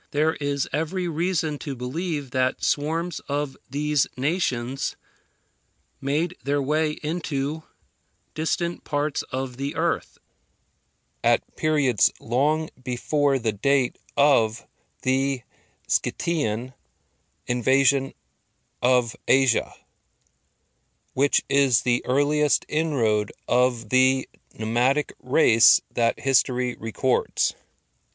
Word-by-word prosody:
There 155 +2 +1
is 140 -1 -1
every 175 +4 -1
reason 165 -2 -1
to 140 -3 -5
believe 145 +2 -4
that 130 0 0
swarms 165 +4 -1
of 145 -1 -2
these 145 0 +1
nations 135 -4 -1 1.1
made 155 +6 -1
their 140 +2 0
way 150 +2 0
into 155 -1 -3 0.7
distant 170 +2 -2
parts 145 0 -1
of 130 -1 -4
the 140 +1 -4
earth, - - -1 1.1
at - - +1
periods 145 -8 +2
long 150 +7 0
before 140 +2 0
the 115 -3 -1
date 130 +4 +1 0.2
of 115 -6 +3 0.4
the 135 -1 0 0.4
Scythian 130 -7 -1 0.7
invasion 135 +3 +2 0.7
of 125 -2 +2
Asia, 130 -2 +3 1.4
which 140 +2 +2
is 135 -4 +3
the 120 0 +1
earliest 145 +1 +2
inroad 115 -10 0 0.2
of 125 -1 +1
the 130 +1 +3 0.3
nomadic 120 +6 +1
race 125 -3 +5
that 115 -1 0
history 125 -2 +2
records. 115 +4 0
135 Hz, 95 wpm, -24 LUFS, 125-150 Hz, 1.4 s, race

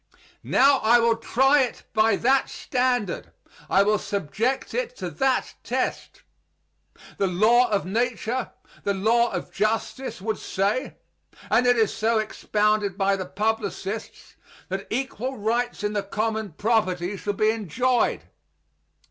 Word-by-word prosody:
Now 275 +1 +4
I 230 +2 +5
will 230 -1 +3
try 270 +5 +3
it 250 - -3
by 215 -1 +4
that 265 +5 +2
standard; 245 -6 -1 0.4
I 195 - +5
will 210 0 +2
subject 215 - -2
it - - -2
to - - -5
that 265 -2 0
test. - - -3 1.0
The 195 - +2
law 225 +7 +4
of 205 -3 0
nature, 235 +4 -1 0.3
the 200 - 0
law 235 +4 +2
of - - -5
justice, 225 +4 -2
would 215 +2 -3
say 205 +8 -1 0.6
and 250 - +4
it 245 0 +4
is 220 -2 +2
so 225 +1 +1
expounded 210 -2 0
by 195 0 +2
the 185 -2 -5
publicists 210 +1 -4 0.3
that 190 +1 -4
equal 265 +1 -3
rights 235 +2 -1
in 210 0 -1
the 205 - 0
common 215 -1 -3
property 195 -2 0
shall 205 +1 -3
be 215 +2 +2
enjoyed. 230 +4 0
220 Hz, 135 wpm, -24 LUFS, 200-245 Hz, 1.0 s, I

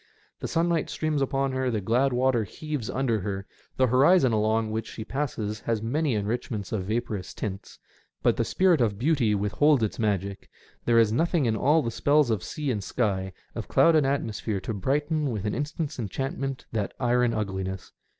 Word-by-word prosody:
The - - -4
sunlight 165 -1 +1
streams 155 -2 -1
upon 135 0 0
her, 130 0 0
the 110 -3 0
glad 120 +7 +2
water 125 -2 +2
heaves 145 +2 -5
under 125 -4 0
her, 95 0 -4 0.3
the 130 - +4
horizon 130 +2 +4
along 110 +1 +1
which 110 0 -3
she 110 - -7
passes 115 -6 -3
has 110 -1 -2
many 140 +2 0
enrichments 105 -1 -3
of 100 -4 -2
vaporous 110 -3 -3
tints; 100 -1 -6 0.5
but - - +4
the - - +1
spirit 180 -6 +3
of 105 -4 +1
beauty 125 -4 +2
withholds 115 +7 +3
its 110 - -2
magic 100 -3 -1 0.2
— - - -32
there 120 -1 +4
is 115 -2 +5
nothing 165 +2 +2
in 110 -2 +1
all 150 +8 +3
the 115 - -2
spells 145 +1 +3
of 110 -4 0
sea 150 -3 -3
and 105 -4 -2
sky, 95 -5 -1 0.2
of - - -5
cloud 165 - +5
and 150 -3 +4
atmosphere, 110 -6 -1
to 110 - -4
brighten 145 - 0
with 110 -4 -3
an 105 - -1
instant's 150 -1 -3
enchantment 135 +4 -3
that 105 -3 -2
iron 125 -1 +2
ugliness. 95 -3 -3
120 Hz, 185 wpm, -26 LUFS, 105-140 Hz, 0.5 s, is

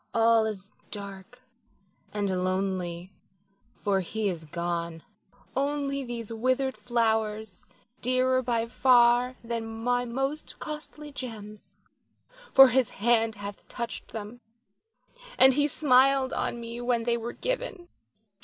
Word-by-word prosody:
All 225 -1 +4
is 200 -2 -6 0.2
dark 200 +4 -9 0.7
and 195 -3 -1
lonely, 185 -1 -2 0.6
for 200 -1 0
he 205 +3 -2
is 165 -3 -5
gone. 170 0 -3 0.5
Only 275 0 -1
these 235 -3 -5
withered 255 +3 0
flowers, 220 -3 -1 0.4
dearer 255 +1 +2
by 235 -2 0
far 245 0 +4
than 230 -1 -3 0.2
my 245 0 +1
most 270 +5 -3
costly 300 -1 -7
gems, 215 -6 -9 0.8
for 270 -1 +9
his 255 -1 +2
hand 225 0 +2
hath 200 0 -8
touched 235 -1 -5
them, 220 +2 -8 1.0
and 265 0 +7
he 290 +2 +2
smiled 270 -2 +3
on 235 - -2
me 235 +1 -6
when 240 -1 +1
they 235 0 +1
were 235 0 -4
given. - - -4
235 Hz, 115 wpm, -28 LUFS, 205-255 Hz, 1.0 s, for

